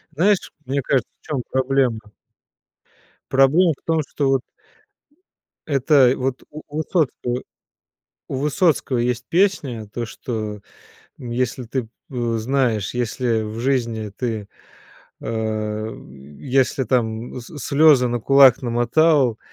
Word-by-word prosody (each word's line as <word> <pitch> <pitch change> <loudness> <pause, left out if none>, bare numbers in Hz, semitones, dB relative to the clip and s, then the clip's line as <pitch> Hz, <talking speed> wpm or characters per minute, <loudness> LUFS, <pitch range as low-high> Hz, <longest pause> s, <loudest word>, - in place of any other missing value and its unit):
Знаешь, 195 +4 +2
мне 140 +2 -1
кажется, 130 -1 0
в - - -29
чём 140 -5 -2
проблемно? 130 -3 +1 1.3
Проблема 140 +6 +4
в - - -33
том, 160 -1 +1
что 140 -2 -1
вот 135 -2 +2 1.2
Это 135 -2 +4
вот 130 0 -2
у 155 +1 -9
у 150 +1 -7
Высоцкого 145 -6 -1 0.9
у - - -4
Высоцкого 150 -1 +1
есть 120 0 -1
песня, 150 - +1
то 120 -1 -3
что, 110 -4 -5 0.6
м, 120 -2 -7
если 125 +1 -2
ты 125 +2 -2
п - - -18 0.2
э, 120 -3 -1
знаешь, 120 -4 0
если 120 -1 0
в 110 +1 -6
жизни 115 -5 -1
ты, 110 -5 -3 0.7
а, 110 -1 -3 0.5
если 135 0 +1
там 115 0 -1
с 145 +6 -11
слёзы 140 -3 +4
на 120 0 -1
кулак 135 -1 +6
намотал 120 +1 +2
125 Hz, 125 wpm, -21 LUFS, 115-140 Hz, 1.3 s, кулак